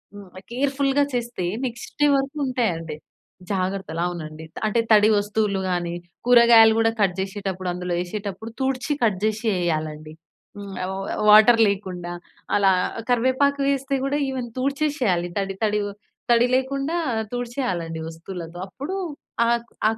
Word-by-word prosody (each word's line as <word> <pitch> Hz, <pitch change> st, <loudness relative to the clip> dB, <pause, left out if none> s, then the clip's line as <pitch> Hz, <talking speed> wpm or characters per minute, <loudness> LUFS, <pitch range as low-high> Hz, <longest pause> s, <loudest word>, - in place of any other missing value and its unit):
హ్మ్, 200 Hz, -1 st, -10 dB, 0.2 s
కేర్‌ఫుల్‌గా 275 Hz, +2 st, +1 dB
చేస్తే 240 Hz, -6 st, -2 dB, 0.2 s
నెక్స్ట్ 240 Hz, -1 st, -6 dB
డే 295 Hz, -, +6 dB
వరకు 275 Hz, +2 st, -1 dB
ఉంటాయండి. 175 Hz, -, -1 dB, 0.6 s
జాగ్రత్తలు 185 Hz, -3 st, -2 dB
అవునండి. 160 Hz, -2 st, -7 dB
త -, -, -11 dB
అంటే 215 Hz, +2 st, +1 dB
తడి 210 Hz, 0 st, +7 dB
వస్తువులు 205 Hz, -1 st, 0 dB
గానీ, 175 Hz, -1 st, -1 dB, 0.3 s
కూరగాయలు 235 Hz, -2 st, +7 dB
గూడా 225 Hz, 0 st, +3 dB
కట్ 190 Hz, -3 st, +2 dB
జేసేటప్పుడు, 190 Hz, -1 st, -3 dB
అందులో 180 Hz, 0 st, -3 dB
ఏసేటప్పుడు 205 Hz, +3 st, -6 dB
తుడ్చి 265 Hz, +2 st, 0 dB
కట్ 210 Hz, -5 st, +2 dB
జేసి 215 Hz, +1 st, 0 dB
ఏయాలండి. 155 Hz, -2 st, -3 dB, 0.4 s
హ్మ్, 200 Hz, -1 st, -8 dB
ఆహ్, 185 Hz, -, -3 dB
వ 195 Hz, 0 st, -5 dB, 0.2 s
వాటర్ 220 Hz, +2 st, +8 dB
లేకుండా 180 Hz, -3 st, -4 dB, 0.4 s
అలా 195 Hz, -1 st, +4 dB, 0.4 s
కరివేపాకు 260 Hz, +4 st, +2 dB
వేస్తే 275 Hz, 0 st, 0 dB
గూడా 285 Hz, +2 st, 0 dB
ఈవెన్ 255 Hz, -2 st, -4 dB
తుడ్చేసేయాలి, 265 Hz, -, 0 dB
తడి 195 Hz, -1 st, -3 dB
తడివొ 210 Hz, -1 st, -1 dB, 0.4 s
తడి 235 Hz, 0 st, +5 dB
లేకుండా 275 Hz, +4 st, 0 dB, 0.4 s
తుడిచేయాలండి 240 Hz, -10 st, -3 dB
వస్తువులతో. 165 Hz, +1 st, -8 dB
అప్పుడు 280 Hz, -, -6 dB, 0.5 s
ఆ -, -, +2 dB, 0.4 s
ఆ -, -, +2 dB
210 Hz, 130 wpm, -23 LUFS, 180-255 Hz, 0.6 s, వాటర్